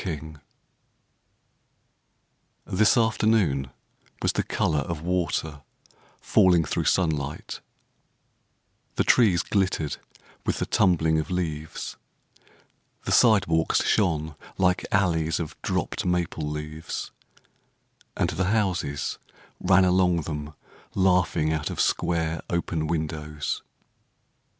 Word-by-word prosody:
1918 80 -3 -6 2.4
THIS 110 +3 +5
afternoon 110 - +2 0.5
was - - +3
the - - 0
colour 75 - 0
of 75 +2 -4
water 80 -4 -1 0.6
falling 90 -3 +4
through - - -2
sunlight; 75 -6 -1 1.4
The - - +2
trees 105 -9 +4
glittered 95 -7 0 0.5
with - - -1
the - - -1
tumbling 80 -4 +2
of 80 - -4
leaves; 80 -4 -4 1.1
The - - -2
sidewalks 95 -9 +4
shone 80 -6 +1 0.2
like 95 0 +1
alleys 80 -5 +1
of 80 -3 -5
dropped - - -2
maple 85 -4 -1
leaves, 75 +1 -5 1.1
And - - +1
the 90 +4 -1
houses 95 -9 -1 0.4
ran 95 0 +4
along 90 -2 +3
them 75 -1 -6 0.4
laughing 90 -4 +2
out 80 -1 -2
of - - -6
square, 85 -2 0
open 85 -2 -1
windows. 75 -2 -3
80 Hz, 100 wpm, -25 LUFS, 75-90 Hz, 2.4 s, THIS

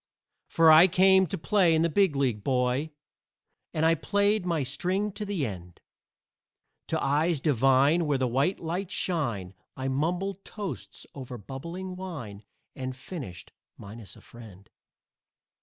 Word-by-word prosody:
For 165 -1 +5
I 160 +4 +9
came 190 +1 +4
to - - -4
play 180 -1 +3
in 160 - +2
the - - +3
Big 185 -1 +2
League, 125 -7 0
boy, 130 +3 0 0.8
And 160 0 0
I 165 - +5
played 200 +3 +1
my 165 -4 0
string 185 +10 -1
to 210 +2 -6
the 195 -8 -2
end. 90 -5 -8 1.1
To - - -1
eyes 150 +3 +1
divine 140 +4 +3
where 145 -2 +1
the 130 -1 0
white 135 +10 0
lights 180 +4 -4
shine 120 - -2 0.2
I 135 0 -2
mumbled 180 +8 -2
toasts 195 - -7
over 130 -3 -8
bubbling 170 - -7
wine 140 - -7 0.3
And 130 -1 -5
finished 130 - -9 0.3
minus 105 +1 -10
a - - -16
friend. 105 -5 -14
155 Hz, 140 wpm, -27 LUFS, 130-180 Hz, 1.1 s, I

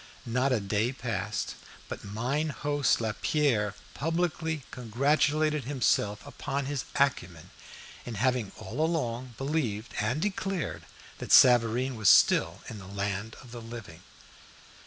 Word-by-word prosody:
Not 125 +3 +1
a 125 - +3
day 105 +4 0
passed 115 -4 -3 0.3
but - - -7
mine 125 +10 -1
host 145 -1 +1
Lapierre 110 -1 +1 0.2
publicly 160 -1 -1
congratulated 145 +4 +1
himself 110 -6 +1
upon 140 -1 -3
his 140 -1 -3
acumen 90 - 0 0.5
in 120 - -6
having 125 -1 0
all 125 +11 -3
along 125 -7 -2
believed 135 -7 -2
and 110 +7 0
declared 190 -2 -2 0.3
that - - -5
Savareen 125 +1 +6
was 105 -4 +4
still - - +5
in 110 - -7
the 95 - -11
land 100 +2 -3
of 125 - -14
the 120 -1 -7
living. 115 -1 -9
125 Hz, 125 wpm, -29 LUFS, 110-145 Hz, 0.5 s, Savareen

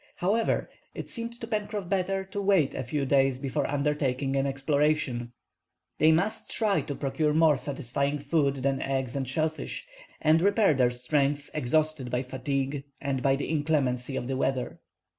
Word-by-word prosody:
However, 215 +6 +1 0.3
it - - -6
seemed 235 0 -5
to - - -3
Pencroff 210 -3 -3
better 195 0 0
to 200 +1 -4
wait 190 -8 +3
a - - -3
few 140 +3 -2
days 135 -1 +3
before 135 +1 -2
undertaking 140 -2 0
an 135 0 +1
exploration. 135 -3 0 0.7
They 155 +1 +6
must 195 +8 0
try 210 -3 +1
to 145 - -5
procure 150 +2 0
more 160 -2 +5
satisfying 140 +1 -2
food 140 -2 0
than 135 0 +1
eggs 135 -2 -2
and 135 -2 -2
shellfish, 155 - -2 0.3
and 160 +1 +4
repair 200 -1 +4
their 125 -3 +3
strength, 140 +3 0
exhausted 155 -1 0
by 125 +1 -1
fatigue 135 +1 -2 0.2
and 135 -2 -2
by 135 0 +3
the 140 - -3
inclemency 140 -4 0
of 120 - -3
the 135 - -1
weather. 130 -1 -1
140 Hz, 160 wpm, -28 LUFS, 135-160 Hz, 0.7 s, They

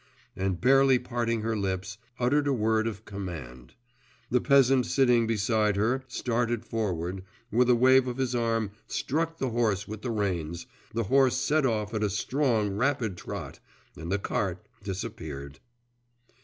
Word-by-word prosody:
and 95 -2 -1
barely 135 +1 +5
parting 120 -2 -2
her 110 +1 -1
lips, 95 0 -3 0.2
uttered 145 +4 +2
a 140 - +2
word 110 -1 +1
of 110 -1 -6
command. 80 -12 -8 0.6
The 125 - +3
peasant 135 -2 +4
sitting 125 -4 +3
beside 105 -1 +1
her 120 +6 +1
started 120 -2 -1
forward, 95 -5 -3 0.3
with 125 +3 +3
a 125 - +6
wave 130 +2 +5
of 125 0 -3
his 130 -2 -1
arm 115 -3 0 0.2
struck 165 +3 -1
the 130 -5 -2
horse 110 -4 0
with 110 0 -7
the 125 - -4
reins 90 -7 -2 0.3
the 115 +1 -1
horse 130 +3 +3
set 150 -2 +2
off 110 -2 -1
at 110 - -1
a 105 - +1
strong 115 0 0
rapid 120 -4 0
trot, 90 - -7 0.4
and 85 +2 -6
the 95 - +2
cart 95 -2 -2 0.2
disappeared. 80 -8 -6
115 Hz, 155 wpm, -28 LUFS, 100-125 Hz, 0.6 s, a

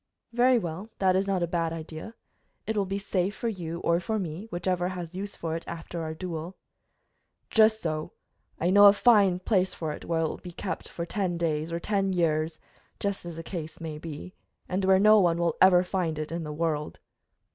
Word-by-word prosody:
"Very 245 +1 +5
well, 180 +1 -4
that 185 -1 +3
is 195 +1 +1
not 190 -3 +1
a - - 0
bad 165 -1 -1
idea. 165 +6 -7 0.5
It 220 - -2
will 200 -2 +1
be 195 +1 -2
safe 195 -1 -1
for 235 - -2
you 170 -5 -5
or 170 0 +2
for 220 +5 -2
me, 180 +1 -5
whichever 180 0 -1
has 180 -2 -5
use 200 +2 -5
for 165 -1 -3
it 165 - -4
after 170 0 -6
our 160 0 -4
duel." 170 +1 -5 0.9
"Just 220 0 +4
so. 155 -2 -3 0.5
I 175 +2 +2
know 205 +1 +8
a 200 - +8
fine 205 -4 +5
place 190 -1 +1
for 160 -2 -3
it, - - -7
where 165 -1 0
it 160 - +1
will - - -6
keep 175 -1 -5
for 170 - -5
ten 180 -1 -1
days 160 -1 -1
or 170 - -2
ten 195 0 0
years; 160 -2 +1 0.4
just 200 -3 -2
as 170 - -6
the 165 - -7
case 160 -3 -6
may 160 -2 -6
be, 160 +3 -8 0.3
and 185 +2 -1
where 190 0 +6
no 215 +2 +7
one 175 -3 +3
will 170 -1 +1
ever 185 -1 +7
find 180 -4 -1
it 155 0 -4
in 170 0 -3
the 150 - -5
world." 150 -1 -2
175 Hz, 210 wpm, -27 LUFS, 165-195 Hz, 0.9 s, know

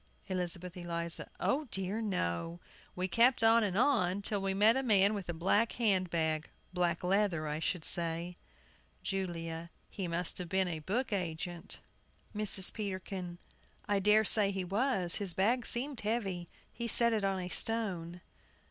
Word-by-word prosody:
ELIZABETH 180 -1 -3
ELIZA. 170 -1 +1
O 295 +4 0
dear, 195 -2 -2
no! 170 - -3 0.4
We 185 +1 -1
kept 230 +6 +3
on 225 0 +5
and 195 -2 -1
on, 205 -7 +1
till 205 -1 -1
we 195 0 -1
met 215 +4 +5
a 265 - +1
man 205 -5 +4
with 200 -4 -6
a - - +1
black 200 +7 +1
hand 195 -6 +1
bag 160 -1 -1 0.2
black 175 -1 -1
leather 185 -4 0
I 150 +1 -3
should 165 0 -2
say. 170 0 +2 0.7
JULIA. 170 -3 -4 0.2
He 190 -4 -4
must 170 +2 -1
have 180 -2 -6
been 190 0 +1
a 165 -3 -4
book 210 - -2
agent. 175 -2 -5 0.5
MRS. 205 -2 +5
PETERKIN. 190 -3 -5 0.5
I 205 -1 +1
dare 210 +2 +4
say 210 -1 +5
he 190 -1 -3
was; 195 -2 0
his 195 -5 0
bag 230 +5 +1
seemed 255 +1 -2
heavy. 195 -6 -3 0.2
He 235 - -4
set 235 0 +4
it 215 -2 -1
on 195 -1 0
a 180 0 -5
stone. 180 -6 -1
190 Hz, 160 wpm, -32 LUFS, 175-215 Hz, 0.7 s, on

